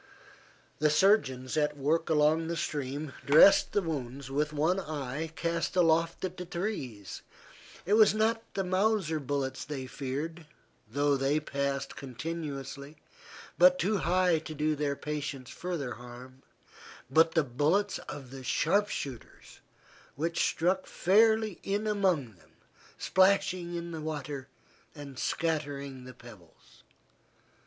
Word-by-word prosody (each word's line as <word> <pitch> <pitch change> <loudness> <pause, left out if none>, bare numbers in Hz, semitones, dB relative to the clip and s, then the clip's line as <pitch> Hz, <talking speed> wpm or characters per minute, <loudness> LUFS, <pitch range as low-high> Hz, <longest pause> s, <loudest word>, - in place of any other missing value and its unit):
The 150 +1 +4
surgeons 145 - +2
at 150 -1 +1
work 155 +4 0
along 155 +1 +3
the 170 0 -2
stream 145 -1 -3
dressed 150 +7 +7
the 205 - +1
wounds 135 -4 -5
with 150 +2 0
one 160 +6 +1
eye 150 -1 -4
cast 170 +1 -2
aloft 165 0 +2
at 185 0 -6
the 180 - -5
trees. 140 - -5 0.6
It 200 - +1
was 215 -1 +7
not 225 +1 +2
the 195 - 0
Mauser 185 -3 +1
bullets 135 -1 -3
they 135 -3 -5
feared, 150 +5 -5 0.4
though 145 +5 +1
they 135 +3 +1
passed 140 -2 -3
continuously, 140 +1 -6 0.6
but 275 0 +7
too 215 -5 +1
high 180 -1 +2
to 155 0 -8
do 150 +1 +1
their 145 -1 -1
patients 145 -3 -5
further 170 -8 -4
harm, 125 +2 -12 0.7
but 160 +5 +4
the 165 - +4
bullets 150 +11 +1
of 135 -4 -8
the 135 -1 -9
sharp 200 +10 +2
shooters 130 -5 -7 0.5
which 165 +3 0
struck 185 +3 0
fairly 220 +1 +3
in 205 +2 -2
among 185 - +1
them, 80 -2 -24 0.4
splashing 185 -2 +2
in 170 0 -5
the 160 -2 -5
water 145 -3 -5 0.5
and 140 -3 -9
scattering 140 -5 -2
the 130 - -10
pebbles. 105 -9 -16
155 Hz, 130 wpm, -30 LUFS, 140-175 Hz, 0.7 s, dressed